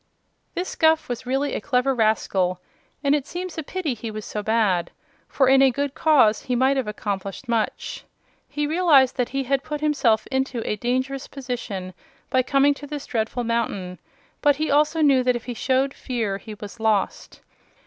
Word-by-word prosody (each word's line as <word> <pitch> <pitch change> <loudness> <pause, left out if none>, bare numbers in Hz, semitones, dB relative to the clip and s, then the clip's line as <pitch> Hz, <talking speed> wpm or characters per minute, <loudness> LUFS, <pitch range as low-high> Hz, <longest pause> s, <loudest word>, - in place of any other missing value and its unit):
This 360 +1 -3
Guph 320 0 +3
was 245 0 -5
really 270 +3 0
a - - -2
clever 270 -1 +1
rascal, 200 -6 +1 0.4
and 280 0 +3
it 290 -1 0
seems 360 0 -5
a 320 - -3
pity 315 -2 -3
he 230 0 -6
was 215 -1 -6
so 210 - -4
bad, 205 -5 +1 0.4
for 265 - +2
in 265 +1 +6
a 270 - +6
good 280 +2 -2
cause 275 -10 +4
he 250 - -2
might 260 +3 +3
have 265 -5 -1
accomplished 200 +2 -4
much. 230 -2 -2 0.5
He 295 0 -2
realized 295 -5 +4
that 250 -2 0
he 275 0 -2
had 270 +1 0
put 300 -1 -4
himself 275 -8 +2
into 265 -3 -1
a - - 0
dangerous 260 +4 -2
position 240 -9 -5 0.4
by 260 - +4
coming 275 +2 +3
to 290 +1 -10
this 290 -1 -6
dreadful 230 +1 -2
mountain, 205 -6 -2 0.4
but 290 -1 +4
he 310 +1 -1
also 300 +3 +3
knew 275 -4 +5
that 250 -1 +2
if 240 - -5
he 245 - -4
showed 265 +3 +1
fear 220 -6 -3
he 215 0 -9
was 205 +2 -10
lost. 215 -3 -1
255 Hz, 185 wpm, -23 LUFS, 220-280 Hz, 0.5 s, in